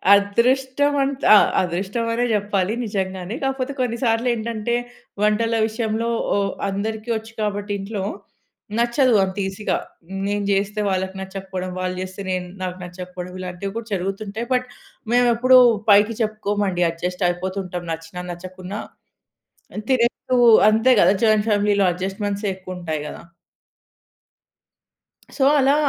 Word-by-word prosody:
అదృష్టం 260 Hz, +7 st, +2 dB
ఆంట్ 275 Hz, 0 st, -3 dB
ఆహ్, -, -, +6 dB
అదృష్టం 190 Hz, +6 st, -2 dB
అనే 245 Hz, +1 st, +1 dB
చెప్పాలి 205 Hz, 0 st, 0 dB
నిజంగానే. 190 Hz, 0 st, -3 dB
కాకపోతే 270 Hz, 0 st, -1 dB
కొన్ని 235 Hz, -2 st, -1 dB
సార్లు 230 Hz, +2 st, +1 dB
ఏంటంటే 230 Hz, +1 st, -2 dB, 0.5 s
వంటల 225 Hz, +2 st, +2 dB
విషయంలో 225 Hz, +1 st, -2 dB, 0.3 s
ఓ -, -, +2 dB, 0.3 s
అందరికి 215 Hz, +3 st, -4 dB
వచ్చు 220 Hz, +1 st, -10 dB
కాబట్టి 205 Hz, 0 st, -2 dB
ఇంట్లో 200 Hz, -1 st, -4 dB, 0.8 s
నచ్చదు 240 Hz, +1 st, +3 dB
అంత 190 Hz, +1 st, -3 dB
ఈజీగా. 195 Hz, +2 st, -2 dB, 0.5 s
నేను 205 Hz, 0 st, -1 dB
చేస్తే 205 Hz, +2 st, 0 dB
వాళ్ళకి 190 Hz, 0 st, -2 dB
నచ్చకపోవడం, 190 Hz, -1 st, -5 dB
వాళ్ళు 185 Hz, 0 st, -2 dB
చేస్తే 185 Hz, +1 st, -6 dB
నేను 185 Hz, -1 st, -2 dB, 0.2 s
నాకు 180 Hz, 0 st, -4 dB
నచ్చకపోవడం, 180 Hz, 0 st, -8 dB
ఇలాంటివి 185 Hz, +2 st, -5 dB
కూడా 230 Hz, 0 st, -6 dB
జరుగుతుంటాయి. 195 Hz, +4 st, -3 dB
బట్ 250 Hz, 0 st, 0 dB, 0.5 s
మేము 245 Hz, 0 st, +4 dB
ఎప్పుడు 255 Hz, +2 st, +6 dB, 0.3 s
పైకి 205 Hz, +2 st, +5 dB
చెప్పుకోమండి 205 Hz, -4 st, 0 dB
అడ్జస్ట్ 180 Hz, +3 st, -4 dB
అయిపోతు 185 Hz, +2 st, -3 dB
ఉంటాం 180 Hz, -1 st, -6 dB
నచ్చినా 165 Hz, +2 st, -7 dB
నచ్చకున్నా 185 Hz, +3 st, -7 dB, 1.1 s
తినేప్పుడు 250 Hz, 0 st, +1 dB, 0.3 s
అంతే 225 Hz, +4 st, +4 dB
కదా 195 Hz, -, +5 dB
జాయింట్ 215 Hz, 0 st, +3 dB
ఫ్యామిలీలో 205 Hz, -1 st, +3 dB
ఎడ్జస్ట్‌మెంట్సే 200 Hz, +2 st, -3 dB
ఎక్కువ 185 Hz, -1 st, -8 dB
ఉంటాయి 155 Hz, -3 st, -3 dB
కదా! -, -, -9 dB, 2.2 s
సో 275 Hz, -, +2 dB, 0.2 s
అలా 275 Hz, +2 st, +4 dB
205 Hz, 125 wpm, -22 LUFS, 185-230 Hz, 2.2 s, ఆహ్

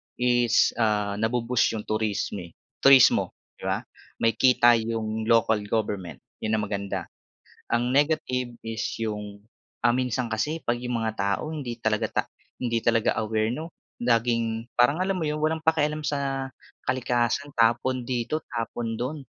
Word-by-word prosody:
is, 120 Hz, -1 st, +3 dB
ah, 105 Hz, -2 st, +1 dB
na-bo-boost 115 Hz, +1 st, +1 dB
yung 105 Hz, -, -4 dB
turisme 105 Hz, -5 st, -2 dB, 0.2 s
turismo 135 Hz, -2 st, +6 dB, 0.2 s
di -, -, -9 dB
ba? -, -, 0 dB, 0.4 s
May 115 Hz, 0 st, +4 dB
kita 120 Hz, -2 st, +5 dB
yung 110 Hz, -1 st, -2 dB
local 115 Hz, -2 st, +4 dB
government 105 Hz, -5 st, -2 dB, 0.2 s
yun 110 Hz, 0 st, -2 dB
ang 105 Hz, -, 0 dB
maganda. 100 Hz, -1 st, -3 dB, 0.6 s
Ang 120 Hz, +1 st, +1 dB
negative 130 Hz, -4 st, +1 dB
is 115 Hz, -1 st, -3 dB, 0.2 s
yung, 105 Hz, -2 st, -4 dB, 0.5 s
ah, 120 Hz, -, +5 dB
minsan 125 Hz, -2 st, -1 dB
kasi 155 Hz, +9 st, -2 dB
pag 120 Hz, 0 st, 0 dB
yung 125 Hz, -1 st, -2 dB
mga 110 Hz, -1 st, -1 dB
tao 100 Hz, +11 st, -1 dB
hindi 125 Hz, -6 st, -5 dB
talaga 110 Hz, -1 st, 0 dB
ta -, -, +1 dB, 0.4 s
hindi 115 Hz, -2 st, 0 dB
talaga 115 Hz, -1 st, +2 dB
aware 110 Hz, +1 st, 0 dB
no 160 Hz, +5 st, -5 dB, 0.3 s
laging 115 Hz, -1 st, +1 dB
parang 125 Hz, +6 st, +4 dB
alam 195 Hz, +1 st, 0 dB
mo 155 Hz, -, -1 dB
yun 150 Hz, 0 st, -1 dB
walang 155 Hz, +1 st, 0 dB
pakialam 155 Hz, -1 st, +1 dB
sa 135 Hz, -2 st, -2 dB, 0.4 s
kalikasan 130 Hz, +2 st, 0 dB
tapon 120 Hz, +2 st, +2 dB
dito, 125 Hz, +5 st, -1 dB
tapon 115 Hz, -1 st, -3 dB
do'n. 140 Hz, +4 st, -3 dB
120 Hz, 145 wpm, -26 LUFS, 110-130 Hz, 0.6 s, turismo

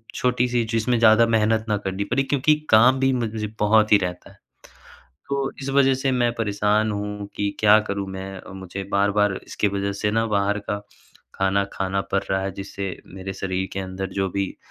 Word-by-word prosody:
छोटी-सी, 125 Hz, -1 st, +1 dB
जिसमें 115 Hz, +2 st, +1 dB
ज़्यादा 115 Hz, 0 st, +6 dB
मेहनत 110 Hz, 0 st, +2 dB
ना 105 Hz, -, +2 dB
करनी 95 Hz, +1 st, -2 dB
पड़े 135 Hz, +2 st, +2 dB
क्योंकि 145 Hz, +2 st, +2 dB, 0.2 s
काम 125 Hz, +4 st, +6 dB
भी 135 Hz, 0 st, +3 dB
मुझे 110 Hz, -3 st, -2 dB
बहुत 105 Hz, +1 st, +3 dB
ही -, -, +9 dB
रहता 90 Hz, +1 st, -5 dB
है। 100 Hz, -, -21 dB, 0.9 s
तो 140 Hz, -1 st, -1 dB
इस 135 Hz, -, -4 dB
वज़ह 135 Hz, -1 st, +4 dB
से 135 Hz, -, +2 dB
मैं 120 Hz, -2 st, +2 dB
परेशान 105 Hz, 0 st, +1 dB
हूँ 105 Hz, 0 st, -4 dB
कि 100 Hz, 0 st, 0 dB
क्या 105 Hz, 0 st, +6 dB
करूँ 100 Hz, -1 st, -2 dB
मैं? 95 Hz, 0 st, -7 dB, 0.2 s
मुझे 95 Hz, +1 st, -6 dB
बार-बार 100 Hz, 0 st, +2 dB
इसकी 105 Hz, -, -1 dB
वज़ह 100 Hz, 0 st, -2 dB
से 105 Hz, -, +2 dB
ना 115 Hz, +1 st, +1 dB
बाहर 100 Hz, +1 st, +1 dB
का 105 Hz, -, -1 dB, 0.6 s
खाना 95 Hz, +1 st, +1 dB
खाना 95 Hz, 0 st, -1 dB
पड़ 100 Hz, -, +2 dB
रहा 95 Hz, 0 st, +1 dB
है, 95 Hz, -, -2 dB
जिससे 95 Hz, -1 st, -6 dB
मेरे 95 Hz, +1 st, -7 dB
शरीर 95 Hz, 0 st, -3 dB
के 95 Hz, -, -3 dB
अंदर 95 Hz, 0 st, -5 dB
जो 95 Hz, -, 0 dB
भी 100 Hz, 0 st, -3 dB
105 Hz, 190 wpm, -23 LUFS, 95-115 Hz, 0.9 s, ही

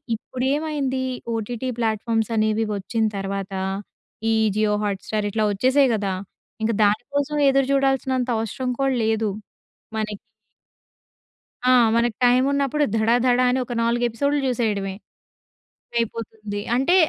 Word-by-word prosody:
ఇప్పుడు 250 Hz, +3 st, -6 dB
ఏమైంది 285 Hz, -4 st, -1 dB, 0.3 s
OTT 235 Hz, +3 st, -3 dB
platforms 225 Hz, 0 st, 0 dB
అనేవి 215 Hz, 0 st, +2 dB
వచ్చిన 220 Hz, +3 st, -1 dB
తర్వాత 195 Hz, 0 st, -4 dB, 0.8 s
ఈ -, -, +3 dB, 0.2 s
'జియో 215 Hz, -1 st, +2 dB
హాట్‌స్టార్' 205 Hz, +1 st, -2 dB
ఇట్లా 215 Hz, 0 st, +1 dB
వచ్చేసాయి 260 Hz, +6 st, +3 dB
కదా! 200 Hz, -2 st, -1 dB, 0.5 s
ఇంక 230 Hz, -, +2 dB
దానికోసం 280 Hz, +8 st, 0 dB
ఎదురుచూడాల్సినంత 270 Hz, -1 st, +1 dB
అవసరం 225 Hz, +4 st, -3 dB
కూడా 270 Hz, -1 st, +2 dB
లేదు 220 Hz, -1 st, +1 dB, 0.7 s
మనకి. 210 Hz, -2 st, -3 dB, 1.5 s
ఆ! -, -, +7 dB, 0.2 s
మనకి 235 Hz, -2 st, +1 dB
టైం 250 Hz, +1 st, +5 dB
ఉన్నప్పుడు 280 Hz, +1 st, +1 dB
ధడధడ 245 Hz, +3 st, +3 dB
అని 255 Hz, -, +1 dB
ఒక 245 Hz, -, -8 dB
4 235 Hz, +1 st, +1 dB
ఎపిసోడ్‌లు 280 Hz, +5 st, 0 dB
చూసేయడమే. 210 Hz, -6 st, -1 dB, 1.0 s
అయిపోతుంది. 220 Hz, -2 st, -3 dB
అంటే 270 Hz, +8 st, +3 dB
230 Hz, 110 wpm, -23 LUFS, 215-260 Hz, 1.5 s, ఆ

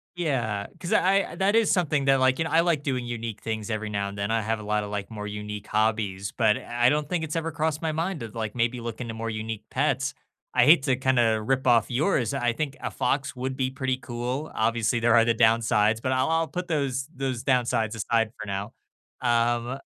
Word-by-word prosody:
Yeah, 120 Hz, -12 st, -1 dB
'cause 170 Hz, -, -3 dB
I 195 Hz, +1 st, +2 dB
that 200 Hz, +2 st, +2 dB
is 225 Hz, -2 st, +4 dB
something 150 Hz, -6 st, +1 dB
that 135 Hz, -1 st, +4 dB
like, 130 Hz, 0 st, +3 dB
you 160 Hz, -, 0 dB
know, -, -, -4 dB
I 165 Hz, -, +5 dB
like 165 Hz, -4 st, +2 dB
doing 130 Hz, -3 st, -1 dB
unique 115 Hz, -2 st, -5 dB
things 110 Hz, 0 st, -4 dB
every 110 Hz, 0 st, -2 dB
now 100 Hz, -1 st, -2 dB
and 100 Hz, -, -9 dB
then, 100 Hz, +1 st, -2 dB
I 115 Hz, 0 st, +1 dB
have 110 Hz, +1 st, -1 dB
a -, -, -8 dB
lot 105 Hz, 0 st, 0 dB
of, 105 Hz, -, -7 dB
like, 100 Hz, -1 st, -4 dB
more 105 Hz, -2 st, -6 dB
unique 105 Hz, 0 st, -6 dB
hobbies, 105 Hz, -2 st, 0 dB
but 110 Hz, -4 st, +2 dB
I 120 Hz, +1 st, +1 dB
don't 150 Hz, +1 st, 0 dB
think 175 Hz, -3 st, -1 dB
it's 155 Hz, 0 st, -4 dB
ever 165 Hz, 0 st, -1 dB
crossed 155 Hz, -1 st, -1 dB
my 160 Hz, -1 st, 0 dB
mind 165 Hz, +3 st, -2 dB
to, 115 Hz, -, -5 dB
like, 110 Hz, -1 st, -5 dB
maybe 120 Hz, +1 st, 0 dB
look 115 Hz, 0 st, -6 dB
into 115 Hz, -2 st, -5 dB
more 115 Hz, 0 st, -4 dB
unique 110 Hz, 0 st, -5 dB
pets. -, -, 0 dB, 0.4 s
I -, -, +5 dB
hate 150 Hz, -2 st, +7 dB
to 135 Hz, -2 st, +2 dB
kinda 120 Hz, -4 st, +2 dB
rip 130 Hz, +4 st, 0 dB
off 120 Hz, -3 st, +4 dB
yours, 125 Hz, -, +1 dB
I 120 Hz, -3 st, +1 dB
think 145 Hz, +2 st, -3 dB
a -, -, -4 dB
fox 135 Hz, -1 st, -1 dB
would 130 Hz, +1 st, -4 dB
be 130 Hz, -1 st, 0 dB
pretty 130 Hz, -1 st, -1 dB
cool. 125 Hz, +4 st, -4 dB
Obviously, 115 Hz, +1 st, +1 dB
there 120 Hz, 0 st, +4 dB
are 115 Hz, -1 st, +6 dB
the 115 Hz, -, +3 dB
downsides, 110 Hz, -1 st, +3 dB
but 130 Hz, -, -2 dB
I'll 130 Hz, +3 st, +1 dB
I'll 165 Hz, 0 st, +1 dB
put 175 Hz, +4 st, -5 dB
those 135 Hz, -4 st, -1 dB
those 130 Hz, -3 st, -3 dB
downsides 120 Hz, -4 st, +1 dB
aside 115 Hz, +1 st, +1 dB
for -, -, -5 dB
now. 100 Hz, +2 st, -4 dB, 0.5 s
Um 120 Hz, +1 st, +1 dB
120 Hz, 230 wpm, -26 LUFS, 110-140 Hz, 0.5 s, hate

